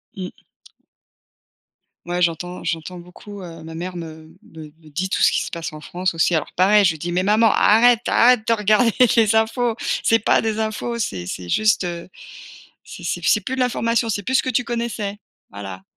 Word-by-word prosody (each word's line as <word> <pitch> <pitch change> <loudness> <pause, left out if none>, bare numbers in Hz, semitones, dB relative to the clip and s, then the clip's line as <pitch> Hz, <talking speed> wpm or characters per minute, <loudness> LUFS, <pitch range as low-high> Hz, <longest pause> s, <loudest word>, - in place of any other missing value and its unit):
Mmh. 185 -3 -6 1.7
Ouais 175 +1 -3
j'entends 175 +1 -2
j'entends 170 +2 -4
beaucoup, 195 +3 -12
heu, 165 -3 -10
ma 160 0 -9
mère 180 +2 -6
me 160 -1 -10
me 160 -1 -13 0.2
me 155 - -16
dit 180 +6 -3
tout - - -2
ce - - +5
qui - - 0
se - - -5
passe 165 -2 -5
en 155 - -10
France 180 +4 -3
aussi 165 +1 +1
alors 155 - -2
pareil 205 +3 +4
je 185 - +4
lui 155 - -12
dis: 175 - -4
«Mais 180 +1 +1
maman 215 +3 +4
arrête 235 +2 +5
arrête 245 -2 +4
de - - 0
regarder 215 +2 +3 0.2
les 220 -2 +3
infos 225 +1 0 0.3
c'est 225 - +3
pas 210 - +2
des 220 -1 -2
infos 220 +2 -3
c'est 90 - -3
c'est 90 0 -6
juste, 210 - +2
heu, 170 -1 -6 0.7
c'est - - -11
c'est - - -3
p - - -2
c'est - - +3
plus 260 - -4
de - - -5
l'information 235 -2 0
c'est 205 -2 -2
plus 260 +7 -2
ce - - +3
que 255 - -2
tu 245 - +1
connaissais», 230 -4 -4 0.3
voilà. 95 -2 -9
195 Hz, 205 wpm, -21 LUFS, 170-225 Hz, 1.7 s, ce